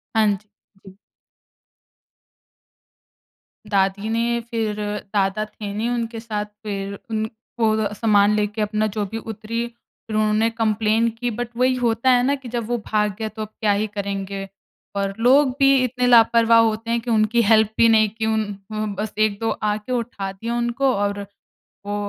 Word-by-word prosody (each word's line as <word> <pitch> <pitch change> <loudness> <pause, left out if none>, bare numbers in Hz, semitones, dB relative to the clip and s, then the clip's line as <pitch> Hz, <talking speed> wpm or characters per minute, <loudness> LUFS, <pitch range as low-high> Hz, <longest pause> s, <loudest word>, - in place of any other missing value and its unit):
हाँ 220 -1 +4
जी, 210 - -20 0.4
जी। 190 0 -13 2.7
दादी 200 +1 +1
ने 235 +1 0
फिर 220 -2 -1 0.4
दादा 200 +1 +1
थे 210 -1 -7
नहीं 215 +3 -2
उनके 230 -1 -3
साथ, 215 -2 -3 0.2
फिर 200 -2 -4
उन 220 0 -1 0.3
वो 220 -1 +4
अ, 205 - -2
सामान 210 -1 +3
लेके 210 +1 -1
अपना 215 +1 0
जो 210 - 0
भी 225 +3 -5
उतरीं, 225 +1 -4
फिर 230 -2 -10
उन्होंने 215 +1 +2
कंप्लेन 225 0 +1
की 245 -1 0
बट 240 +1 -4
वही 255 +1 +3
होता 240 0 +1
है 245 -1 +5
ना, 280 - +2
कि 270 -3 -8
जब 235 -1 -3
वो 240 +1 -1
भाग 210 -2 +1
गया, 220 -1 -2
तो 215 0 -7
अब 215 - -5
क्या 210 -2 +3
ही 205 +2 0
करेंगे? 195 -1 -4 0.5
और 195 0 -1
लोग 260 +4 +5
भी 275 -1 +5
इतने 250 0 0
लापरवाह 230 -1 +6
होते 225 0 -1
हैं 235 0 +1
कि 235 +1 -5
उनकी 225 +1 +3
हेल्प 220 0 +4
भी 230 - +6
नहीं 220 -1 +5
की, 220 +2 -4
उन 220 0 +1 0.3
अ, 215 0 -2 0.2
बस 215 0 -3
1-2 215 +1 +1
आके 210 +3 -2
उठा 230 -5 -3
दिया 230 +5 -4
उनको 240 +3 +1
और 200 0 -2 0.6
वो 205 - -2
220 Hz, 170 wpm, -22 LUFS, 210-235 Hz, 2.7 s, लापरवाह